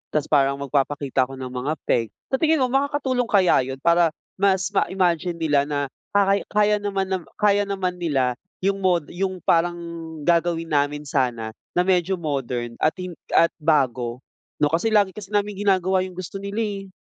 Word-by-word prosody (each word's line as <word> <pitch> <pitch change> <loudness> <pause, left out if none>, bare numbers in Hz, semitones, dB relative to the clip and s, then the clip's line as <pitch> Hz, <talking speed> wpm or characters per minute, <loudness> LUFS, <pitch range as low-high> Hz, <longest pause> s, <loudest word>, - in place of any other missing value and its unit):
'tas 150 -1 0
parang 140 -2 +4
magpapakita 140 -1 0
ako 135 - -9
ng 130 -1 -6
mga 130 +4 -2
peg. 115 -1 +1 0.2
Sa 265 - +1
tingin 320 -2 +3
mo 250 - 0
makakatulong 270 -2 0
kaya 195 -5 +4
yun 135 0 -6
para 170 -1 +4 0.3
mas 190 -1 +2
ma-imagine 180 -3 +1
nila 145 -4 +1
na 145 -1 -1 0.4
kay 200 0 +4
kaya 210 0 +2
naman 195 -2 -2
nam 190 -1 0
kaya 205 -1 +2
naman 185 -2 -2
nila 130 -7 0 0.2
yung 195 +1 +1
mod 175 -5 +1
yung 185 0 -3
parang 175 +1 +2 0.5
gagawin 170 0 +1
namin 145 0 +1
sana 125 -6 -1 0.2
na 180 - +4
medyo 185 0 +2
modern 125 -7 -3
at 155 - +2
hin 180 -1 -6 0.2
at 165 - +5
bago, 130 -5 +1 0.4
'no, 145 - +3
kasi 170 +7 +1
lagi 205 -3 +3
kasi 205 +1 -9
naming 205 -1 0
ginagawa 190 -1 +3
yung 185 -1 -4
gusto 185 +2 -6
nila, 200 +3 -2
eh. 200 -2 -4
175 Hz, 175 wpm, -23 LUFS, 145-195 Hz, 0.5 s, at